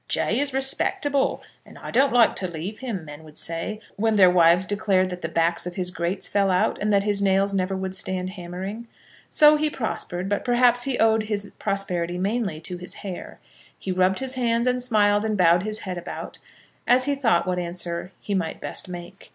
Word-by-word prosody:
"Jay - - +1
is 285 0 0
respectable, 270 +1 +1 0.2
and - - -15
I - - -8
don't 270 +3 +3
like 240 -2 +4
to 185 - +1
leave 175 +5 -6
him," 220 -11 -5
men 150 +1 -10
would 155 -1 -15
say, 165 +6 -4 0.2
when 220 +1 +1
their 185 -3 +6
wives 175 +1 +5
declared 195 -2 +1
that 180 0 -6
the 165 - -3
backs 170 +1 0
of 175 - -6
his 180 -2 +3
grates 175 +2 -2
fell 200 -1 +1
out, 180 -1 +1
and 210 +1 0
that 200 -1 +3
his 205 -1 +1
nails 195 0 +2
never 190 0 0
would 190 0 -4
stand 185 -1 -3
hammering. 190 +5 -7 0.4
So 300 0 +6
he 305 0 +1
prospered; 195 -8 -4
but, 205 0 -1
perhaps, 245 0 +3
he 270 -3 -1
owed 220 -1 +3
his 205 -1 -2
prosperity 180 -4 -2
mainly 195 -3 -1
to 180 +1 -5
his 180 +1 -8
hair. 185 -3 -7 0.4
He 190 - -5
rubbed 185 +1 +2
his 265 -1 -2
hands, 235 -2 0
and 250 0 +1
smiled, 210 -4 +3
and 215 -1 -1
bowed 175 -1 +4
his 215 +2 -3
head 185 -3 -5
about, 175 - -8 0.5
as 250 +2 +4
he 285 - +1
thought 230 -12 +2
what 180 0 -1
answer 175 0 -3
he 205 - -4
might 180 -4 -2
best - - -5
make. 175 +2 -10
195 Hz, 205 wpm, -24 LUFS, 180-225 Hz, 0.5 s, their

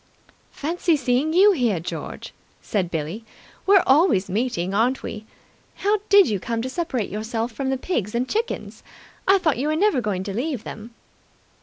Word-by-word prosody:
"Fancy 330 +1 0
seeing 270 +3 +1
you 385 +5 +6
here, 240 - +1
George!" 165 - -7 0.3
said 190 -5 -2
Billie. 165 +7 -4 0.4
"We're 395 -1 +6
always 260 - +3
meeting, 195 -4 -1
aren't 245 +6 +1
we? 215 0 -7 0.5
How 415 +2 +1
did 400 -2 +7
you 205 -3 -1
come 230 +3 -3
to 260 - -3
separate 265 - -2
yourself 225 +3 -3
from 265 +3 -3
the 265 - 0
pigs 235 - -2
and 245 +2 0
chickens? 450 - -3 0.5
I 390 +1 +6
thought 315 -9 0
you 280 - 0
were 310 - +1
never 375 -6 +2
going 200 -4 -2
to 200 0 -5
leave 255 +1 -2
them." 225 +2 -9
245 Hz, 170 wpm, -23 LUFS, 210-320 Hz, 0.5 s, did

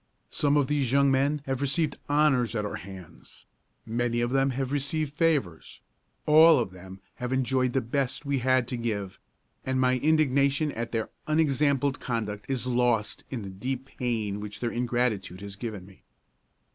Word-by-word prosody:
Some 145 0 +2
of 145 - +3
these 140 -3 0
young 140 0 +4
men 140 +2 +1
have 135 0 -2
received 145 +3 0
honors 145 -5 +2
at 105 -1 -1
our 105 - -4
hands; 95 -1 -12 0.4
many 120 +1 -1
of 120 +1 0
them 135 0 +2
have 130 0 -2
received 145 +1 -1
favors; 145 - -1 0.5
all 160 +1 +7
of 115 -7 -1
them 95 +1 -11 0.2
have 125 0 -4
enjoyed 130 -1 +1
the 135 - +2
best 135 +4 -2
we 140 -1 0
had 130 -1 +2
to 125 - -3
give: 105 -5 -3 0.4
and 130 0 -1
my 130 0 +2
indignation 145 -1 +2
at 115 -2 -5
their 115 -2 -2 0.2
unexampled 145 -3 +2
conduct 110 -3 -4
is 130 -3 -1
lost 120 -4 0
in 120 -5 -4
the 100 - -6
deep 125 +7 -4
pain 110 -5 -1
which 105 0 -7
their 120 -1 -2
ingratitude 120 -6 -1
has 100 -1 -7
given 105 -4 -6
me." 95 -1 -18
125 Hz, 170 wpm, -27 LUFS, 115-140 Hz, 0.5 s, all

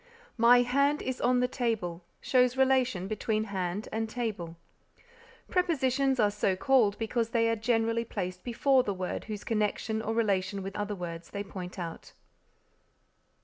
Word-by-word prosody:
"My 245 +2 +7
hand 280 +4 +1
is 260 -1 -3
on 250 0 +3
the 250 - +2
table" 220 -9 -2 0.2
shows 250 0 +3
relation 255 -8 +2
between 215 +1 -1
hand 195 -1 -3
and 220 0 -2
table. 210 -8 -4 0.9
Prepositions 275 -7 +1
are 210 -2 +4
so 200 -2 0
called 220 -1 +3
because 225 0 -1
they 230 -1 +2
are 230 - +2
generally 230 0 +1
placed 185 -5 -5
before 260 +2 +3
the 200 -5 -3
words 185 +2 -4
whose 210 -2 -5
connection 220 0 -1
or 225 +1 -2
relation 195 -3 0
with 195 +1 -6
other 205 0 -2
words 170 -2 -7
they 200 0 -4
point 185 -2 -8
out. 170 -2 -7
220 Hz, 150 wpm, -29 LUFS, 195-250 Hz, 0.9 s, My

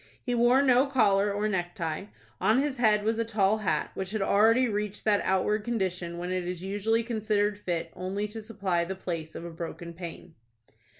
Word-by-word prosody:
He 245 - -1
wore 240 +3 +4
no 260 0 +4
collar 205 -6 +3
or 205 +1 0
necktie. 175 - -2 0.3
On 220 +4 +3
his 280 -1 -1
head 215 -3 +3
was 225 +1 0
a - - +2
tall 215 -1 +1
hat, 210 - -1
which 190 -1 -4
had 215 0 -2
already 225 +6 +4
reached 210 -2 -3
that 210 -2 +3
outward 200 +3 +1
condition 185 -7 -2
when 175 +1 -4
it 185 -1 -2
is 180 0 -4
usually 205 +4 0
considered 215 -3 0
fit 175 -5 -3
only 195 +3 -3
to 220 +1 -6
supply 200 -6 -1
the 190 +3 -4
place 165 -4 -5
of 170 - -6
a 170 - -6
broken 170 +1 -7
pane. 170 0 -9
205 Hz, 190 wpm, -28 LUFS, 180-225 Hz, 0.3 s, wore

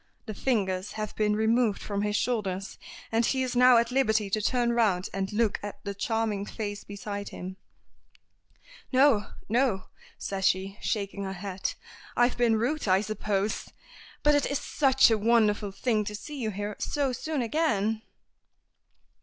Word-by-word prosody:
The 215 - -5
fingers 195 -6 -1
have 215 -1 -4
been 210 -1 +2
removed 220 0 +2
from 200 -1 -3
his 210 0 0
shoulders, 200 -5 -2 0.3
and 225 +1 +2
he 260 +2 +1
is 255 -1 -3
now 250 0 +7
at 235 +1 +2
liberty 220 -6 +2
to 215 - +1
turn 240 +1 +1
round 205 -6 +2
and 195 0 -2
look 215 -1 +1
at 205 0 -6
the 200 - -3
charming 215 0 -1
face 205 -1 -5
beside 200 0 -6
him. 185 +1 -7 1.3
"No, 260 -5 +4 0.2
no!" 230 -4 +1 0.3
says 195 -1 -1
she, 195 +2 -1
shaking 200 -2 -2
her 190 - -4
head. 190 0 -4 0.4
"I've 240 +1 +4
been 235 -2 +3
rude, 245 +5 -1
I 190 +1 +4
suppose. 210 -1 -2 0.5
But 295 - +5
it 290 - +2
is 280 - 0
such 265 -4 +4
a 220 - +2
wonderful 210 -2 +3
thing 215 +1 0
to 210 - -4
see 290 +7 -7
you 220 - 0
here 205 +1 -4
so 280 -3 0
soon 295 +1 -2
again." 225 -6 0
215 Hz, 160 wpm, -28 LUFS, 200-240 Hz, 1.3 s, now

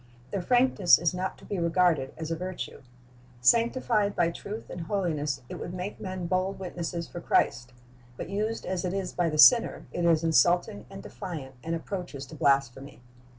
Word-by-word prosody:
Their 200 - -2
frankness 245 -4 +4
is 170 +1 0
not 185 +1 -3
to - - -16
be 200 - -3
regarded 170 -5 +2
as 160 0 -5
a - - 0
virtue. 185 +2 -6 0.6
Sanctified 230 - +2
by 170 -1 +2
truth 210 +6 -7
and 175 - -6
holiness, 155 -7 -2
it - - -7
would 175 - -6
make 185 +3 -5
men 185 -2 -5
bold 185 +3 -1
witnesses 175 -2 -5
for 175 - -8
Christ; 120 -5 +1 0.5
but - - -5
used 215 +3 -2
as 185 0 -2
it 180 +1 -2
is 190 -2 -3
by 175 -2 +1
the 155 - -3
sinner, 230 - +6
it 175 - -3
is 165 -1 +3
insulting 175 - +2
and 195 0 -10
defiant, 160 -9 -7
and 165 +1 -2
approaches 165 -5 -6
to 155 - -12
blasphemy. 140 -2 0
175 Hz, 180 wpm, -28 LUFS, 160-195 Hz, 0.6 s, sinner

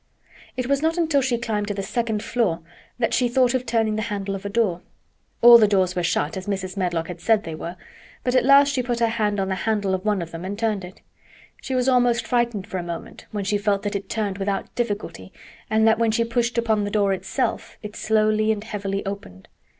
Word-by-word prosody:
It 255 - -1
was 280 +2 +1
not 325 +2 +1
until 320 -5 +2
she 250 -2 0
climbed 215 -3 -2
to 205 - -3
the 195 - -3
second 220 0 -2
floor 195 -9 0 0.4
that 235 -2 0
she 245 -1 +2
thought 250 0 +3
of 255 -1 -1
turning 225 -2 +1
the - - -1
handle 200 -1 -3
of 195 - -6
a - - -4
door. 200 -5 0 0.6
All 240 0 +10
the 215 - +5
doors 190 -3 +1
were 180 - 0
shut, 165 -3 0
as 190 0 -6
Mrs. 190 -2 -3
Medlock 175 -4 -1
had 175 -1 -8
said 215 +3 +3
they 165 - -6
were, 170 +2 -6 0.5
but 250 - 0
at 255 - +4
last 280 +2 +6
she 260 - +1
put 240 -1 -2
her 235 - +3
hand 210 -3 0
on 190 - 0
the - - 0
handle 200 +1 -1
of 185 0 -2
one 210 -4 0
of 165 - -10
them 165 +1 -7
and 195 +2 -4
turned 215 -3 -1
it. 180 +1 -11 0.6
She 265 - -3
was 250 0 +1
almost 245 -2 +3
frightened 235 -5 0
for 190 -3 -4
a - - -2
moment 170 -1 -8
when 205 -2 -3
she 205 +1 +1
felt 200 -1 0
that 205 0 -2
it 200 -1 -4
turned 205 -3 -2
without 195 0 -2
difficulty 205 - -4 0.4
and 220 0 +3
that 220 0 +4
when 230 -1 +3
she 225 +1 +2
pushed 235 +1 -1
upon 220 -3 +1
the 205 - -2
door 200 -2 +2
itself 190 - -3
it 210 0 -7
slowly 215 0 +2
and 210 -1 -2
heavily 200 -3 -4
opened. 195 - -7
210 Hz, 235 wpm, -23 LUFS, 195-235 Hz, 0.6 s, All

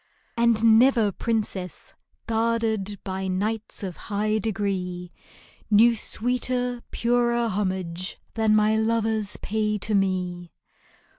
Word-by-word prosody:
And 230 -1 +5
never 240 -5 +4
princess, 205 -5 -3 0.3
guarded 225 -3 0
By 190 0 -3
knights 210 +4 -3
of 185 -3 -5
high 215 +1 -1
degree, 190 -4 -3 0.6
Knew 225 +3 +6
sweeter, 245 +2 -1
purer 235 0 +1
homage 185 -3 -2 0.2
Than 220 -1 +2
my 215 0 +3
lovers 220 -2 0
pay 215 0 0
to 210 +2 -2
me 180 -3 -1
215 Hz, 100 wpm, -25 LUFS, 190-230 Hz, 0.6 s, Knew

